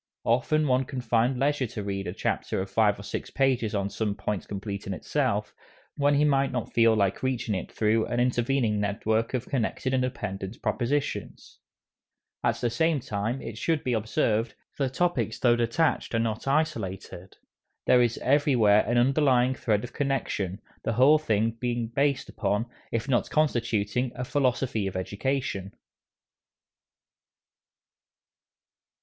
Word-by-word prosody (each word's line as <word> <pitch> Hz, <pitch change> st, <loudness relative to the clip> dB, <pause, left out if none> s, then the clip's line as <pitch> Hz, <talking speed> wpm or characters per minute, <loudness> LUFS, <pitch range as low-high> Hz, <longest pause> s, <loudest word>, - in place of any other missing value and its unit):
Often 150 Hz, +6 st, +2 dB
one 130 Hz, 0 st, +2 dB
can 130 Hz, 0 st, -5 dB
find 120 Hz, +1 st, +1 dB
leisure 140 Hz, 0 st, +1 dB
to 105 Hz, -1 st, -6 dB
read 100 Hz, -1 st, -3 dB
a 90 Hz, -, -3 dB
chapter -, -, -1 dB
of 95 Hz, 0 st, -4 dB
five 105 Hz, -1 st, +3 dB
or -, -, -8 dB
six 100 Hz, -, -5 dB
pages 130 Hz, -6 st, +1 dB
on 100 Hz, -1 st, 0 dB
some 105 Hz, -2 st, -2 dB
point 105 Hz, -2 st, -3 dB
complete 100 Hz, 0 st, -5 dB
in 100 Hz, -, -2 dB
itself, -, -, -1 dB, 0.4 s
when 145 Hz, 0 st, +3 dB
he 145 Hz, +1 st, +4 dB
might 140 Hz, -2 st, +2 dB
not 125 Hz, -2 st, -4 dB
feel 115 Hz, -1 st, +5 dB
like 100 Hz, -3 st, +1 dB
reaching 130 Hz, -4 st, -1 dB
it 95 Hz, -, -4 dB
through 110 Hz, +1 st, +1 dB
an 120 Hz, 0 st, -1 dB
intervening 120 Hz, -2 st, +1 dB
network 110 Hz, +3 st, 0 dB
of 125 Hz, 0 st, -2 dB
connected 130 Hz, +1 st, -1 dB
and 130 Hz, -, +2 dB
dependent 100 Hz, -5 st, -4 dB
propositions. 120 Hz, +7 st, -2 dB, 0.8 s
At -, -, +2 dB
the 120 Hz, -, 0 dB
same 160 Hz, +5 st, +2 dB
time, 115 Hz, +3 st, -3 dB
it 115 Hz, -1 st, -7 dB
should 160 Hz, -3 st, 0 dB
be 125 Hz, -, 0 dB
observed, 110 Hz, 0 st, 0 dB, 0.2 s
the 135 Hz, -2 st, 0 dB
topics 130 Hz, -, 0 dB
though 120 Hz, -2 st, +4 dB
detached 120 Hz, +3 st, 0 dB
are -, -, +2 dB
not 115 Hz, +2 st, -2 dB
isolated. 105 Hz, -, -2 dB, 0.5 s
There 125 Hz, -, +5 dB
is 120 Hz, -1 st, +1 dB
everywhere 125 Hz, -7 st, +4 dB
an 120 Hz, -, +1 dB
underlying 130 Hz, 0 st, +3 dB
thread 110 Hz, -5 st, 0 dB
of 125 Hz, -, -8 dB
connection, 110 Hz, -9 st, -2 dB, 0.2 s
the 115 Hz, -, -1 dB
whole 135 Hz, +7 st, +6 dB
being 115 Hz, -1 st, -1 dB
based 140 Hz, 0 st, +1 dB
upon, 105 Hz, +1 st, -1 dB, 0.3 s
if 115 Hz, +3 st, -2 dB
not 130 Hz, -3 st, +1 dB
constituting, 120 Hz, -5 st, 0 dB
a 125 Hz, +1 st, -4 dB
philosophy 125 Hz, -6 st, 0 dB
of 95 Hz, -, -5 dB
education. 100 Hz, 0 st, -2 dB
120 Hz, 150 wpm, -27 LUFS, 105-135 Hz, 0.8 s, whole